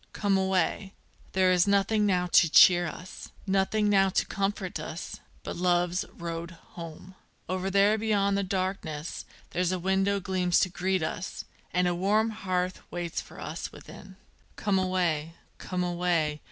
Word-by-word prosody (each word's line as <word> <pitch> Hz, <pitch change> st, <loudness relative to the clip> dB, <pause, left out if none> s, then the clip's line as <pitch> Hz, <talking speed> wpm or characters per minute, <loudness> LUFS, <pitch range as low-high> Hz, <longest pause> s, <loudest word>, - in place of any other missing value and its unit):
come 200 Hz, -2 st, +1 dB
away! 190 Hz, +1 st, 0 dB, 0.4 s
there 185 Hz, -1 st, +4 dB
is 180 Hz, +1 st, +3 dB
nothing 205 Hz, +1 st, +2 dB
now 180 Hz, -2 st, +2 dB
to 175 Hz, -1 st, +5 dB
cheer 175 Hz, +2 st, +7 dB
us 180 Hz, +3 st, -9 dB, 0.2 s
Nothing 195 Hz, +2 st, +1 dB
now 195 Hz, -1 st, +4 dB
to 190 Hz, -, +1 dB
comfort 195 Hz, -3 st, -2 dB
us, 155 Hz, +2 st, -6 dB, 0.2 s
but -, -, -5 dB
love's 175 Hz, 0 st, +1 dB
road 170 Hz, 0 st, -5 dB, 0.2 s
home: 170 Hz, +2 st, -9 dB, 0.3 s
Over 185 Hz, +1 st, -2 dB
there 200 Hz, +3 st, +4 dB
beyond 200 Hz, -2 st, +1 dB
the 200 Hz, -, +1 dB
darkness 185 Hz, -5 st, -3 dB, 0.3 s
there's 180 Hz, 0 st, 0 dB
a 185 Hz, -, 0 dB
window 190 Hz, +2 st, +1 dB
gleams 180 Hz, -2 st, +1 dB
to 185 Hz, -, +2 dB
greet 185 Hz, 0 st, -1 dB
us, 180 Hz, +3 st, -4 dB, 0.3 s
And 180 Hz, 0 st, +2 dB
a 175 Hz, -, +1 dB
warm 210 Hz, +5 st, +2 dB
hearth 185 Hz, -3 st, -2 dB
waits 175 Hz, -1 st, -3 dB
for -, -, -13 dB
us 155 Hz, +3 st, -5 dB
within._ 190 Hz, -1 st, -12 dB, 0.4 s
Come 200 Hz, -2 st, +1 dB
away! 170 Hz, -4 st, 0 dB, 0.2 s
come 180 Hz, -1 st, -3 dB
away! 175 Hz, -4 st, 0 dB
185 Hz, 155 wpm, -28 LUFS, 175-195 Hz, 0.4 s, cheer